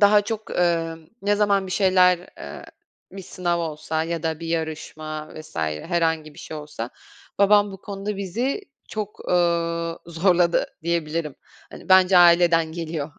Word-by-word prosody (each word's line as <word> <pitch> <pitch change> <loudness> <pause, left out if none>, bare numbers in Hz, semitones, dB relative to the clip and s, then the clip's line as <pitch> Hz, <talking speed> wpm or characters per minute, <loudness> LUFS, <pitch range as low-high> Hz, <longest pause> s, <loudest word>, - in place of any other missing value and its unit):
daha 205 0 +7
çok, 220 0 -5
ııı, 165 -2 0 0.2
ne 205 +1 +2
zaman 200 -2 +2
bir 185 - -5
şeyler, 185 -2 +4 0.2
ııı, - - -8 0.5
bir 195 -1 -8
sınav 175 -1 -2
olsa 160 0 -2
ya 165 0 -3
da 160 -1 -2
bir 165 - -5
yarışma 155 -1 -4
vs. 155 - -11
herhangi 155 - -1
bir - - -15
şey 160 - -7
olsa 150 -6 -6 0.5
babam 205 0 +5
bu 195 - -10
konuda 200 0 -5
bizi 235 - -2 0.3
çok, 210 -1 -6
ııı, 170 -1 +1
zorladı 170 0 +2 0.2
diyebilirim. 165 -3 -2 0.4
Hani, - - -12
bence 185 -1 +6
aileden 170 -2 +5
geliyor. 160 -3 -4
170 Hz, 145 wpm, -23 LUFS, 160-190 Hz, 0.5 s, daha